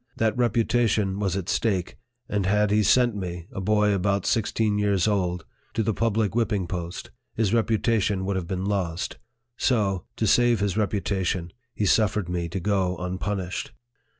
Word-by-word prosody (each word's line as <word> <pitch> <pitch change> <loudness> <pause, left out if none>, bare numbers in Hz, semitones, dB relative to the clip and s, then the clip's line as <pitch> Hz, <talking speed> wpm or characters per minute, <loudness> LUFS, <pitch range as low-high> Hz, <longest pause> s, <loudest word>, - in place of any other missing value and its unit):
That 110 -1 +1
reputation 115 -4 +1
was 95 -2 0
at 95 -2 -4
stake; 95 -6 0 0.3
and 100 -3 -1
had 105 +1 +2
he 105 +1 +4
sent 120 +2 +4
me 90 -3 -5
a 95 - -5
boy 105 +1 +2
about 100 0 0
sixteen 110 -2 +1
years 100 -2 +2
old 90 -5 0 0.3
to 110 - +1
the 110 +1 0
public 110 -2 0
whipping 110 -5 0
post, 85 -1 -5 0.2
his 110 -2 +1
reputation 110 -3 +1
would 100 0 -1
have 90 -3 -3
been 95 +1 -3
lost; 90 -4 -2 0.4
so, 100 -7 +1
to 110 - -1
save 120 +2 +4
his 100 -2 0
reputation, 95 -4 -1 0.2
he 105 - 0
suffered 105 -2 +2
me 85 -1 -2
to 95 +3 -3
go 95 -1 0
unpunished. 95 +1 -3
100 Hz, 160 wpm, -25 LUFS, 95-110 Hz, 0.4 s, he